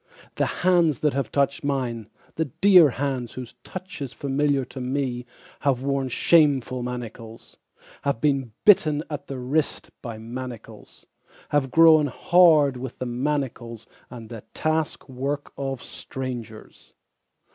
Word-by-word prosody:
The -, -, 0 dB, 0.2 s
hands 170 Hz, -7 st, +3 dB
that 150 Hz, -2 st, +2 dB
have 135 Hz, -5 st, -2 dB
touched 140 Hz, 0 st, 0 dB
mine, 125 Hz, -6 st, -2 dB, 0.2 s
the 160 Hz, -, -1 dB
dear 180 Hz, +3 st, +6 dB
hands 130 Hz, -2 st, -3 dB
whose 125 Hz, -2 st, -8 dB
touch 185 Hz, -4 st, -8 dB
Is 135 Hz, -2 st, -5 dB
familiar 140 Hz, -1 st, 0 dB
to 130 Hz, -, -9 dB
me 125 Hz, -1 st, -2 dB, 0.3 s
Have 135 Hz, -3 st, 0 dB
worn 140 Hz, -1 st, 0 dB
shameful 135 Hz, -3 st, +3 dB
manacles, 115 Hz, -2 st, -8 dB, 0.4 s
have 140 Hz, -5 st, -1 dB
been 135 Hz, -3 st, 0 dB
bitten 155 Hz, -7 st, +5 dB
at 150 Hz, -1 st, -5 dB
the 135 Hz, -, -5 dB
wrist 140 Hz, +5 st, -2 dB
by 115 Hz, -4 st, -6 dB
manacles, 120 Hz, +1 st, -9 dB, 0.4 s
have 145 Hz, -2 st, +1 dB
grown 160 Hz, 0 st, +6 dB
hard 155 Hz, -3 st, +4 dB
with 125 Hz, 0 st, -7 dB
the 130 Hz, -, -4 dB
manacles 120 Hz, -3 st, -3 dB, 0.2 s
and 115 Hz, -3 st, -10 dB
the 115 Hz, -3 st, -8 dB
task 155 Hz, 0 st, -1 dB
work 140 Hz, +2 st, -4 dB
of 135 Hz, -2 st, -4 dB
strangers. 120 Hz, -4 st, -8 dB
135 Hz, 135 wpm, -24 LUFS, 125-145 Hz, 0.4 s, dear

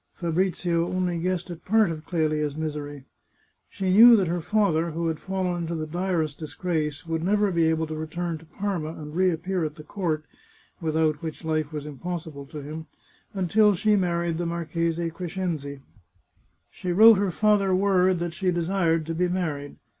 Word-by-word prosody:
Fabrizio 175 Hz, 0 st, 0 dB
only 180 Hz, -2 st, -1 dB
guessed 180 Hz, +1 st, -2 dB
at 170 Hz, -, -9 dB
part 215 Hz, -2 st, +3 dB
of 155 Hz, -1 st, -7 dB
Clelia's 155 Hz, -4 st, 0 dB
misery. 150 Hz, -3 st, -5 dB, 0.7 s
She 190 Hz, -2 st, -2 dB
knew 235 Hz, +4 st, +9 dB
that 195 Hz, -4 st, +3 dB
her 175 Hz, +1 st, -1 dB
father, 170 Hz, -4 st, +1 dB
who 165 Hz, +1 st, -3 dB
had 160 Hz, -1 st, -3 dB
fallen 190 Hz, -2 st, -2 dB
into 170 Hz, 0 st, -3 dB
the 155 Hz, -1 st, -3 dB
direst 165 Hz, -2 st, -2 dB
dis 155 Hz, -2 st, -8 dB
grace, 155 Hz, -4 st, -2 dB
would 165 Hz, -1 st, -2 dB
never 205 Hz, +2 st, +2 dB
be 170 Hz, -2 st, +2 dB
able 160 Hz, 0 st, +1 dB
to 155 Hz, -, -6 dB
return 160 Hz, +1 st, -4 dB
to 165 Hz, -, -16 dB
Parma 170 Hz, -2 st, -3 dB
and 150 Hz, -1 st, -9 dB
reappear 180 Hz, 0 st, +1 dB
at 150 Hz, -1 st, -3 dB
the 155 Hz, -, -11 dB
court 155 Hz, -3 st, -2 dB, 0.6 s
(without 155 Hz, -2 st, +1 dB
which 160 Hz, 0 st, -6 dB
life 155 Hz, -1 st, -1 dB
was 150 Hz, -2 st, -5 dB
impossible 150 Hz, -1 st, -6 dB
to 150 Hz, 0 st, -8 dB
him) 155 Hz, +2 st, -7 dB, 0.5 s
until 200 Hz, +3 st, +3 dB
she 210 Hz, +4 st, +3 dB
married 170 Hz, -3 st, 0 dB
the 175 Hz, -, -1 dB
Marchese 170 Hz, 0 st, -2 dB
Crescenzi. 165 Hz, -5 st, -4 dB, 0.9 s
She 180 Hz, -, -4 dB
wrote 215 Hz, +3 st, +8 dB
her 200 Hz, -1 st, +1 dB
father 200 Hz, 0 st, +2 dB
word 185 Hz, -1 st, +3 dB
that 170 Hz, 0 st, -3 dB
she 185 Hz, +2 st, -1 dB
desired 170 Hz, -2 st, +1 dB
to 165 Hz, -, -3 dB
be 180 Hz, +2 st, +1 dB
married. 155 Hz, -6 st, -3 dB
170 Hz, 175 wpm, -25 LUFS, 155-185 Hz, 0.9 s, knew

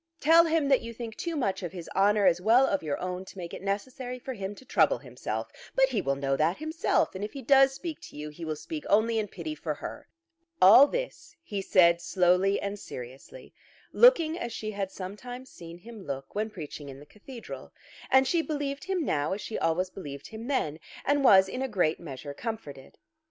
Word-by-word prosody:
Tell 330 Hz, +2 st, +6 dB
him 320 Hz, -3 st, +1 dB
that 270 Hz, -, +4 dB
you 230 Hz, -1 st, -8 dB
think 230 Hz, -1 st, -7 dB
too 340 Hz, -1 st, -4 dB
much 205 Hz, -11 st, -1 dB
of 175 Hz, -3 st, -5 dB
his 175 Hz, -3 st, -8 dB
honour 205 Hz, +1 st, +3 dB
as 180 Hz, -1 st, +4 dB
well 235 Hz, +7 st, +5 dB
of 195 Hz, -6 st, 0 dB
your 150 Hz, -3 st, -2 dB
own 180 Hz, 0 st, -4 dB
to 195 Hz, -, -13 dB
make 175 Hz, -2 st, -7 dB
it -, -, -7 dB
necessary 245 Hz, +6 st, -4 dB
for 260 Hz, +1 st, -6 dB
him 200 Hz, -2 st, -5 dB
to 260 Hz, -, -15 dB
trouble -, -, +3 dB
himself. -, -, -5 dB, 0.2 s
But 265 Hz, 0 st, +4 dB
he 230 Hz, -6 st, 0 dB
will 140 Hz, -3 st, 0 dB
know 135 Hz, 0 st, 0 dB
that 160 Hz, +6 st, +1 dB
himself, 315 Hz, +2 st, 0 dB
and 190 Hz, +1 st, -5 dB
if 210 Hz, -, -5 dB
he 275 Hz, -, -7 dB
does 270 Hz, +1 st, +5 dB
speak 325 Hz, +1 st, -6 dB
to -, -, -12 dB
you, 150 Hz, +1 st, -5 dB
he 150 Hz, +3 st, -10 dB
will 155 Hz, -1 st, -2 dB
speak 300 Hz, -, -7 dB
only 220 Hz, +2 st, +3 dB
in 210 Hz, -, -2 dB
pity 170 Hz, -5 st, -6 dB
for 155 Hz, 0 st, -4 dB
her." -, -, -8 dB, 0.5 s
All 220 Hz, +10 st, +9 dB
this -, -, -5 dB
he 205 Hz, -10 st, -4 dB
said 170 Hz, -3 st, +4 dB
slowly 180 Hz, +2 st, +2 dB
and 200 Hz, +1 st, -4 dB
seriously, 130 Hz, -, -10 dB, 0.4 s
looking 345 Hz, -9 st, +5 dB
as 240 Hz, -, -4 dB
she 215 Hz, -1 st, -4 dB
had 200 Hz, -2 st, -3 dB
sometimes 245 Hz, +7 st, -8 dB
seen 170 Hz, 0 st, -11 dB
him 220 Hz, +2 st, -11 dB
look 135 Hz, -1 st, -6 dB
when 215 Hz, +2 st, -1 dB
preaching 150 Hz, -6 st, -8 dB
in 135 Hz, 0 st, -10 dB
the 145 Hz, -, -13 dB
cathedral. 225 Hz, -, -10 dB, 0.4 s
And 265 Hz, 0 st, +5 dB
she 340 Hz, +2 st, +2 dB
believed 290 Hz, -1 st, -4 dB
him 370 Hz, -4 st, -1 dB
now 145 Hz, -, 0 dB
as 200 Hz, -, -4 dB
she 225 Hz, -, -4 dB
always 180 Hz, +3 st, 0 dB
believed 140 Hz, -8 st, -8 dB
him 220 Hz, +2 st, -8 dB
then, 160 Hz, -, -1 dB, 0.3 s
and 285 Hz, 0 st, +2 dB
was 190 Hz, -6 st, +7 dB
in 255 Hz, -, -5 dB
a 265 Hz, -, 0 dB
great 180 Hz, -9 st, +1 dB
measure 145 Hz, -3 st, -8 dB
comforted. 145 Hz, -, -7 dB
205 Hz, 215 wpm, -28 LUFS, 170-265 Hz, 0.5 s, All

